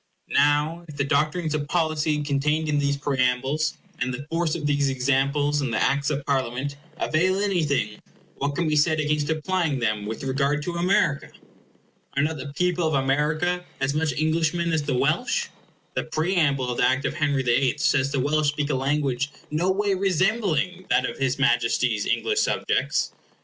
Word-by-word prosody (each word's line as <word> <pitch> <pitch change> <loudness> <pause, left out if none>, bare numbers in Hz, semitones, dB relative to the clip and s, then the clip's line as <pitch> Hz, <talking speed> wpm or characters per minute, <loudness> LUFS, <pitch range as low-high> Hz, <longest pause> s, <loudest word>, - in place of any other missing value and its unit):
Now 150 +4 +2
if 150 -2 -10
the 140 - +1
doctrines 155 +3 0
of 145 -1 -2
policy 155 -2 0
contained 150 +2 0
in 150 -1 +1
these 140 0 +1
preambles, 135 +2 0 0.2
and 125 - -1
the 130 +3 -6
force 165 -1 0
of 155 -3 -4
these 145 -1 +2
examples 140 +3 +1
in 135 - -1
the 115 - -1
Acts 140 +2 +1
of 145 -2 -3
Parliaments, 135 0 -1 0.2
avail 185 +5 +1
anything, 155 - 0 0.4
what 140 +1 -2
can 170 0 0
be 155 - +1
said 155 +1 +3
against 150 -1 0
applying 160 -1 0
them 110 -4 -1
with 110 +4 -5
regard 140 +2 0
to 175 - -3
America? 170 -5 +1 0.9
Are 140 - +3
not 155 +1 -1
the 140 +1 -7
people 180 +1 +1
of 155 - 0
America 150 +6 +1 0.2
as 135 +1 0
much 155 -1 0
Englishmen 160 +3 0
as 160 -1 +1
the 140 -3 -1
Welsh? - - 0 0.4
The - - -2
preamble 155 -7 +1
of 120 - -4
the - - +4
Act 130 +1 0
of - - -1
Henry 145 -4 0
the 125 - +2
Eighth 130 +2 +1
says 135 -1 +2
the 140 - 0
Welsh 150 +3 +1
speak 145 0 0
a - - 0
language 135 0 0 0.2
no 165 +5 +1
way 200 +1 +1
resembling 185 -2 0
that 130 - +3
of 120 - -7
his 135 -1 0
Majesty's 120 -4 +1
English 430 -1 +1
subjects. - - 0
145 Hz, 180 wpm, -24 LUFS, 135-160 Hz, 0.9 s, the